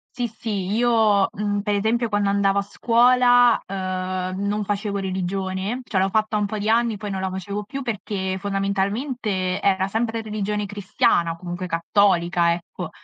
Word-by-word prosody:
Sì, 245 Hz, -2 st, -1 dB
sì, 215 Hz, -3 st, -4 dB
io, 220 Hz, -3 st, +3 dB
mhmm, 205 Hz, 0 st, -2 dB
per 210 Hz, -1 st, 0 dB
esempio 225 Hz, +3 st, 0 dB
quando 205 Hz, -1 st, +1 dB
andavo 200 Hz, 0 st, +2 dB
a 200 Hz, -, +2 dB
scuola, 245 Hz, +2 st, +4 dB
uhm, 185 Hz, 0 st, -3 dB
non 210 Hz, +1 st, 0 dB
facevo 200 Hz, 0 st, -2 dB
religione, 190 Hz, +3 st, -2 dB
cioè 190 Hz, -6 st, 0 dB
l'ho 195 Hz, -, +1 dB
fatta 215 Hz, +1 st, +1 dB
un 210 Hz, -, +1 dB
po' 215 Hz, +1 st, -3 dB
di 205 Hz, +1 st, -2 dB
anni, 230 Hz, -2 st, +2 dB
poi 205 Hz, 0 st, -5 dB
non 190 Hz, -1 st, -3 dB
la 190 Hz, -, -1 dB
facevo 200 Hz, +2 st, -4 dB
più 275 Hz, +6 st, -6 dB
perché 200 Hz, -6 st, -3 dB
fondamentalmente 200 Hz, 0 st, -1 dB
era 190 Hz, -1 st, +1 dB
sempre 225 Hz, +2 st, -1 dB
religione 210 Hz, -1 st, -3 dB
cristiana, 190 Hz, -4 st, +1 dB
comunque 175 Hz, +1 st, -5 dB
cattolica, 175 Hz, -1 st, +2 dB
ecco. 170 Hz, +1 st, -6 dB
200 Hz, 160 wpm, -23 LUFS, 190-220 Hz, -, scuola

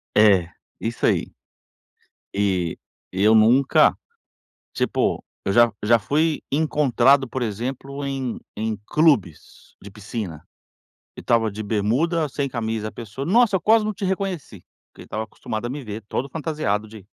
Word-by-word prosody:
É, 100 Hz, -5 st, +5 dB, 0.3 s
isso 115 Hz, +1 st, -2 dB
aí. -, -, +1 dB, 1.0 s
E 95 Hz, -5 st, 0 dB, 0.4 s
e 95 Hz, -, -2 dB
eu 110 Hz, +1 st, +6 dB
nunca, 120 Hz, +5 st, +5 dB, 0.8 s
tipo, -, -, 0 dB, 0.2 s
eu -, -, 0 dB
já 120 Hz, +2 st, +5 dB
já 115 Hz, +3 st, +5 dB
fui 155 Hz, +7 st, 0 dB
encontrado, 140 Hz, -3 st, +3 dB
por 130 Hz, +2 st, -4 dB
exemplo, 130 Hz, +5 st, -4 dB
em 135 Hz, -3 st, -3 dB, 0.2 s
em 110 Hz, 0 st, -2 dB
clubes 140 Hz, -, 0 dB
de 100 Hz, -, -10 dB
piscina, 100 Hz, -6 st, -6 dB, 0.7 s
e -, -, -7 dB
estava 115 Hz, -2 st, +2 dB
de 105 Hz, +2 st, -6 dB
bermuda, 130 Hz, -, +1 dB
sem 140 Hz, 0 st, -2 dB
camisa, 110 Hz, -3 st, -3 dB
a -, -, -10 dB
pessoa: 115 Hz, +3 st, -7 dB
Nossa, 215 Hz, +1 st, +4 dB
eu -, -, -2 dB
quase 220 Hz, +2 st, +4 dB
não 215 Hz, -, -1 dB
te 200 Hz, 0 st, -6 dB
reconheci", 185 Hz, -, -3 dB, 0.3 s
porque -, -, -13 dB
estava 110 Hz, +1 st, -4 dB
acostumado 110 Hz, 0 st, -5 dB
a -, -, -4 dB
me 140 Hz, +2 st, -5 dB
ver, 110 Hz, -2 st, -7 dB
todo 135 Hz, -, -2 dB
fantasiado 150 Hz, -10 st, -2 dB
de 105 Hz, -3 st, -12 dB
120 Hz, 150 wpm, -23 LUFS, 105-145 Hz, 1.0 s, eu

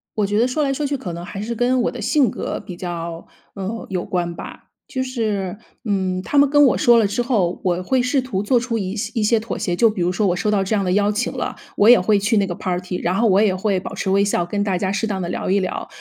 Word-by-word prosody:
我 210 Hz, -, +1 dB
觉 205 Hz, +1 st, 0 dB
得 240 Hz, -, +3 dB
说 300 Hz, +4 st, -1 dB
来 275 Hz, -1 st, +1 dB
说 295 Hz, +2 st, -2 dB
去 280 Hz, 0 st, -1 dB
可 180 Hz, -9 st, -6 dB
能 170 Hz, +1 st, -6 dB
还 195 Hz, +2 st, -6 dB
是 230 Hz, +2 st, -3 dB
跟 250 Hz, +2 st, +2 dB
我 -, -, 0 dB
的 245 Hz, -, -7 dB
性 255 Hz, +2 st, +3 dB
格 -, -, -4 dB
比 180 Hz, -, -9 dB
较， 170 Hz, -1 st, -6 dB, 0.3 s
呃， 200 Hz, +4 st, -5 dB
有 185 Hz, -2 st, -2 dB
关 175 Hz, -2 st, -2 dB
吧。 -, -, -10 dB, 0.2 s
就 260 Hz, -, -3 dB
是， 215 Hz, -7 st, -2 dB, 0.3 s
嗯， 190 Hz, -3 st, -1 dB
他 285 Hz, -, -2 dB
们 280 Hz, -1 st, +6 dB
跟 290 Hz, 0 st, +6 dB
我 265 Hz, -, +3 dB
说 240 Hz, -5 st, +5 dB
了 210 Hz, -, +3 dB
之 245 Hz, -, -1 dB
后， 205 Hz, -8 st, 0 dB
我 180 Hz, -1 st, 0 dB
会 255 Hz, +7 st, +1 dB
试 255 Hz, +2 st, +1 dB
图 205 Hz, -6 st, -3 dB
做 240 Hz, +3 st, +3 dB
出 235 Hz, -1 st, -2 dB
一 190 Hz, -2 st, -3 dB
些 215 Hz, 0 st, -3 dB
一 225 Hz, -, +1 dB
些 225 Hz, +1 st, +3 dB
妥 215 Hz, -1 st, -5 dB
协， 175 Hz, -, -2 dB
就 230 Hz, +6 st, +4 dB
比 210 Hz, -4 st, -4 dB
如 175 Hz, +1 st, +1 dB
说 205 Hz, +2 st, +1 dB
我 180 Hz, -, +1 dB
收 210 Hz, +2 st, 0 dB
到 200 Hz, -2 st, +2 dB
这 215 Hz, -, 0 dB
样 200 Hz, -, +1 dB
的 180 Hz, -, 0 dB
邀 205 Hz, +2 st, +2 dB
请 210 Hz, +3 st, -1 dB
了， -, -, -4 dB, 0.2 s
我 210 Hz, -, +6 dB
也 245 Hz, -, +9 dB
会 200 Hz, +3 st, +2 dB
去 215 Hz, +3 st, +1 dB
那 200 Hz, -1 st, +3 dB
个 180 Hz, -, -4 dB
party， 180 Hz, +1 st, -3 dB
然 175 Hz, +2 st, -1 dB
后 230 Hz, +4 st, +2 dB
我 195 Hz, +2 st, +4 dB
也 200 Hz, -4 st, +3 dB
会 190 Hz, -1 st, 0 dB
保 -, -, -7 dB
持 190 Hz, -, -2 dB
微 200 Hz, +1 st, +3 dB
笑 175 Hz, -4 st, 0 dB
跟 205 Hz, +3 st, -2 dB
大 190 Hz, -3 st, 0 dB
家 190 Hz, +1 st, -1 dB
适 220 Hz, +3 st, -1 dB
当 195 Hz, -3 st, -2 dB
地 170 Hz, -, -3 dB
聊 -, -, -3 dB
一 195 Hz, +1 st, +3 dB
聊。 185 Hz, -, -4 dB
205 Hz, 325 characters per minute, -21 LUFS, 185-235 Hz, 0.3 s, 也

